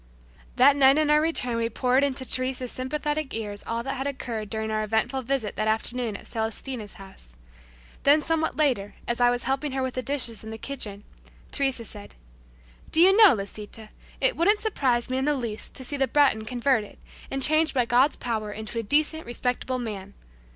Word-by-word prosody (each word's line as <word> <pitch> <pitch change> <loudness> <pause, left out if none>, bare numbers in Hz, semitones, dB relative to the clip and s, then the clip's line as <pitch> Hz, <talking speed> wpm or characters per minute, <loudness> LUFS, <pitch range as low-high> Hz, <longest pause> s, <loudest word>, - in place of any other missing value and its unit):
That 265 +3 +6
night 275 0 +5
on 305 -1 +2
our 300 0 +5
return 250 -7 0
we 230 0 0
poured 250 +3 +2
into 270 -1 -1
Teresa's 255 -1 -2
sympathetic 295 +2 -3
ears 205 -2 -5
all 230 +1 -2
that 270 +1 -4
had 270 +2 -2
occurred 235 -6 -5
during 220 0 -3
our 215 0 0
eventful 220 +5 0
visit 255 -4 -2
that 215 - 0
afternoon 225 0 -1
at - - -15
Celestina's 225 0 -4
house. 190 - -15 0.7
Then 290 +2 +5
somewhat 320 +1 -1
later 255 -10 0
as 240 +1 -1
I 245 - +6
was 245 0 -1
helping 270 +2 -1
her 265 -1 -1
with 260 -1 -2
the 255 - -2
dishes 250 -5 +1
in 220 - -8
the 220 - -6
kitchen, 210 -6 -6 0.5
Teresa 270 -4 0
said, 205 -1 -9 0.8
"Do 320 - +3
you 380 +3 +7
know, 425 - +8
Lisita, 210 +2 -7 0.3
it - - +3
wouldn't 410 +6 +3
surprise 260 - 0
me 255 +1 -1
in 265 - -1
the 295 0 +2
least 230 -5 -4
to 260 - 0
see 285 +3 -1
the 270 -1 +2
Breton 265 -8 +3
converted 240 -2 0 0.3
and 270 0 -2
changed 310 +1 +3
by 250 -2 +3
God's 250 +5 +3
power 220 -3 -3
into 220 +2 -5
a - - 0
decent, 305 +7 +1
respectable 250 +1 -2
man. 200 -5 -6
250 Hz, 195 wpm, -26 LUFS, 220-280 Hz, 0.8 s, know